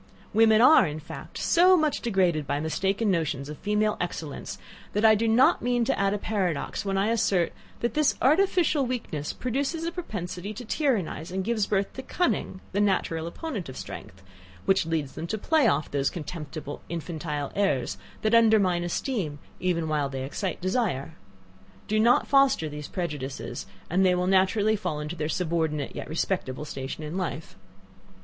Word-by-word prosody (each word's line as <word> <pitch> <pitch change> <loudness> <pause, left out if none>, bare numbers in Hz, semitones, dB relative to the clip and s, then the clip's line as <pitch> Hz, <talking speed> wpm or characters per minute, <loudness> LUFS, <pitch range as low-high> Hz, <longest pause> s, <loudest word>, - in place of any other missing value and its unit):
Women 220 0 +5
are, 250 - +7
in 150 +1 -5
fact, 150 - -9
so 365 +2 +5
much 310 -3 +1
degraded 180 -9 +1
by 145 - 0
mistaken 195 +7 0
notions 150 -5 -1
of 150 - -8
female 210 +1 +1
excellence, 155 - -5 0.4
that 210 +2 +2
I 220 - +8
do 225 +2 +1
not 230 +4 +4
mean 245 -1 +1
to - - 0
add 195 0 +2
a - - -1
paradox 190 -7 -2
when 195 -1 -1
I 200 +3 +2
assert, 195 -6 +1 0.3
that 235 -1 0
this 305 -1 +2
artificial 315 0 +3
weakness 180 - -3
produces 280 +6 -2
a 335 - -1
propensity 200 - -5
to 245 +3 -7
tyrannize, 210 - -1
and 190 +1 -2
gives 220 -1 0
birth 200 -1 0
to 265 - -6
cunning, 265 - -1
the 200 - +1
natural 170 -5 0
opponent 210 - -5
of 130 - -8
strength, 95 +1 -9 0.4
which 190 -4 +3
leads 155 -4 -1
them 165 - -5
to 220 - -2
play 305 +4 +3
off 150 -7 +1
those 140 -1 +1
contemptible 155 -3 -6
infantile 155 -3 -4
airs 135 - 0 0.2
that 215 +1 +2
undermine 215 -6 +4
esteem 175 - -2 0.2
even 170 -3 0
whilst 145 -3 -1
they 130 0 -3
excite 180 +8 -3
desire. 185 - -1 0.7
Do 215 +1 +1
not 235 +3 +4
foster 275 - +4
these 150 -1 -6
prejudices, 140 - -5 0.2
and 185 +3 +2
they 180 -1 +4
will 180 0 0
naturally 195 +3 +3
fall 180 -7 -3
into 150 +3 -4
their 155 -2 -2
subordinate, 160 -4 -1
yet - - -6
respectable 155 -4 -2
station 135 +1 -6
in 155 +4 -4
life. 170 -4 -4
185 Hz, 170 wpm, -27 LUFS, 155-220 Hz, 0.7 s, I